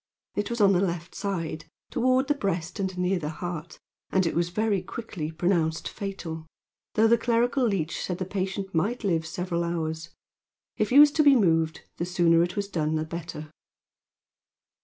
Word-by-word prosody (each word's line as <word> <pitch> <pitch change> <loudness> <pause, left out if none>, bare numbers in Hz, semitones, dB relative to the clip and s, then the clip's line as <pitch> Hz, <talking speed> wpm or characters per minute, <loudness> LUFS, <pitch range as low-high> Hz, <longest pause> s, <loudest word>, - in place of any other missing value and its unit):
It 205 - -2
was 235 0 -3
in 200 -2 +6
the 180 -1 +3
left 175 -2 -2
side, 170 -6 -3 0.3
toward 255 +2 +2
the 295 - +3
breast 195 - -3
and 190 -2 -2
near 180 +1 +1
the 150 -2 -3
heart, 170 0 -6 0.3
and 190 -1 +3
it 165 - 0
was 170 +1 +1
very 205 0 0
quickly 190 -9 -5
pronounced 165 0 0
fatal, 170 -6 -6 0.5
though 220 - +5
the 235 +1 +4
clerical 240 +2 +2
leech 175 -6 -1
said 180 - -3
the 185 - -3
patient 195 +1 -3
might 205 +10 0
live 165 -5 0
several 175 0 -2
hours. 160 -1 -3 0.7
If 215 - 0
he 255 - +4
was 295 0 +9
to 305 +1 +3
be 285 -2 +7
moved, 165 -7 +2 0.2
the 170 - -1
sooner 170 -2 +3
it 175 +1 -1
was 200 -1 -2
done 160 -5 -1
the 155 0 -1
better. 160 -2 -7
180 Hz, 180 wpm, -27 LUFS, 165-205 Hz, 0.7 s, was